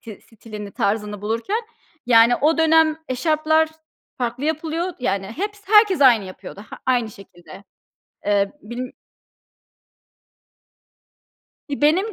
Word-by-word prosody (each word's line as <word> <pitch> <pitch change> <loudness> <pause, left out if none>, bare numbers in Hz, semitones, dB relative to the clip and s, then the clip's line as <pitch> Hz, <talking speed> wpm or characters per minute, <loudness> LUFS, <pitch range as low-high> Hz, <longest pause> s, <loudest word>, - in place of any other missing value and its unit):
ti 220 -4 -11
stilini, 210 -2 -9
tarzını 205 0 -2
bulurken, 230 - -2 0.5
yani, 235 0 +6
o 315 +3 +2
dönem 320 -1 +4
eşarplar 315 +4 +1 0.5
farklı 250 +2 -3
yapılıyor, 320 +3 -2
yani, 195 -5 -1
heps 405 - -5
herkes 420 -3 +5
aynı 240 -7 +6
yapıyordu, 185 +1 -10
ha - - -9
aynı 240 -4 +1
şekilde. 195 -1 -14 0.6
Ee, 200 -1 +1
bilIm 245 +3 -6 2.8
İii, 285 0 -5
benim 370 +9 +3
255 Hz, 110 wpm, -21 LUFS, 210-320 Hz, 2.8 s, yani